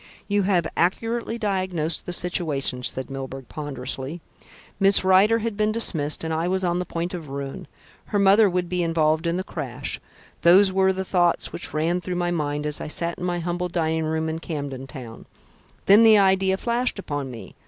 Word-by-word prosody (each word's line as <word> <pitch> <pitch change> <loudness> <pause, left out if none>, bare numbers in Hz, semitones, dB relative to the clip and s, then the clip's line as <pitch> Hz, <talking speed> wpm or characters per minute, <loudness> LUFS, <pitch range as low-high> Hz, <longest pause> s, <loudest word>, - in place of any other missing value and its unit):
"You 205 0 +2
have 175 -4 +2
accurately 230 +6 0
diagnosed 185 -7 -2
the - - -2
situation," 155 -8 -1
said 130 +2 0
Milburgh 135 -1 -6
ponderously. 135 +1 -5 0.6
"Miss 195 -1 +5
Rider 190 +4 +5
had 230 -1 -3
been 215 +1 +1
dismissed, 160 -11 0
and 160 0 -2
I 165 +2 0
was 190 +1 0
on 175 0 +1
the 180 - -3
point 170 +2 -3
of 165 -5 -6
ruin. 140 +6 -6 0.4
Her 205 - -2
mother 200 +1 +5
would 180 -1 -1
be 180 0 -1
involved 160 -1 +1
in 170 +1 0
the 185 - -2
crash 135 -9 -5 0.4
those 190 +3 +6
were 190 0 +3
the 190 0 -3
thoughts 175 -2 +1
which 175 - -5
ran 165 +4 0
through 180 0 -4
my 175 0 0
mind 150 -3 -2
as 150 0 -2
I - - -4
sat 170 +2 -3
in 180 - -3
my 175 -1 -1
humble 175 +1 -2
dining 160 -2 0
room 160 0 -1
in 160 0 -3
Camden 140 -5 -5
Town. 125 -6 -10 0.6
Then 200 +3 +7
the 220 -1 +7
idea 190 -1 +3
flashed 240 +3 -1
upon 145 -8 -4
me. 115 -6 -10
175 Hz, 190 wpm, -24 LUFS, 150-190 Hz, 0.6 s, Then